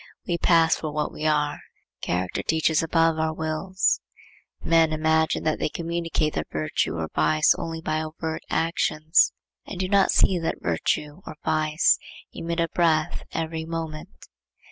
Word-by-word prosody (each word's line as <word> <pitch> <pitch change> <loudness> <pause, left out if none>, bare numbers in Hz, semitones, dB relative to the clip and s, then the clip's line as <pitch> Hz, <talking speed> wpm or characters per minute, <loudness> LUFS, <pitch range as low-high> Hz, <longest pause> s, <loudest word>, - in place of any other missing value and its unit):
We 170 -1 -1
pass 165 -1 +4
for 155 - -4
what 150 0 -2
we 155 - -2
are. 150 -1 +1 0.4
Character 90 0 -2
teaches 160 -1 +1
above 165 0 +2
our 160 0 0
wills. 160 +5 0 0.6
Men 165 -1 +4
imagine 160 0 +1
that 155 -1 0
they - - 0
communicate 165 -2 -2
their 75 - -3
virtue 75 +2 -1
or 80 -1 -3
vice 155 0 +3
only 165 -1 -5
by 155 -1 -1
overt 160 0 -5
actions, 160 0 +2 0.4
and 185 - -7
do 185 - 0
not 195 0 +3
see 185 -2 +3
that 165 - -1
virtue 145 - -2
or - - -7
vice 155 0 +2 0.3
emit 170 +1 -4
a 165 - +2
breath 160 -3 +1
every 160 0 -3
moment. 160 -1 -5
160 Hz, 150 wpm, -25 LUFS, 155-165 Hz, 0.6 s, pass